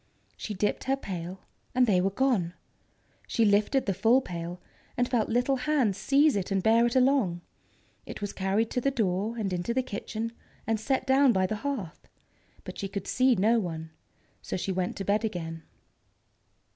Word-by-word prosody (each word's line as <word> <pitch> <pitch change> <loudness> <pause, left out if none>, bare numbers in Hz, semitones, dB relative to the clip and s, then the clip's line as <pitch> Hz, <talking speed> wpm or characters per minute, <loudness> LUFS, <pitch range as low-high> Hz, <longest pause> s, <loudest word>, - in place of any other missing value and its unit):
She 210 - -6
dipped 205 +2 -1
her 270 +1 +1
pail, 185 -5 -6 0.3
and 255 0 +5
they 190 -6 +3
were 195 - +2
gone. 195 -6 0 0.7
She 230 - +2
lifted 210 +6 +3
the 195 - 0
full 230 +7 +4
pail, 175 -5 -6 0.4
and 245 - +2
felt 240 -4 0
little 245 +4 +1
hands 255 -7 +1
seize 280 +5 +4
it 195 -1 -2
and 195 -2 0
bear 230 +2 +5
it 235 - -3
along. 255 -10 +3 0.7
It - - -7
was 205 -1 -4
carried 200 +4 0
to 250 - -1
the 275 - +2
door, 215 -2 -1
and 200 -4 -2
into 180 +7 -2
the 260 - +2
kitchen, 225 -1 -4 0.3
and 225 -1 0
set 260 +4 -1
down 265 -1 +5
by 190 -1 +2
the 215 +3 -2
hearth. 230 - -5 0.6
But - - -8
she 195 - -2
could 200 -1 -5
see 255 0 +3
no 225 +4 +3
one, 160 -4 -5 0.5
so - - -4
she 190 - -2
went 185 -1 -2
to 195 - -5
bed 205 +3 +1
again. 165 -6 -4
215 Hz, 185 wpm, -28 LUFS, 190-250 Hz, 0.7 s, and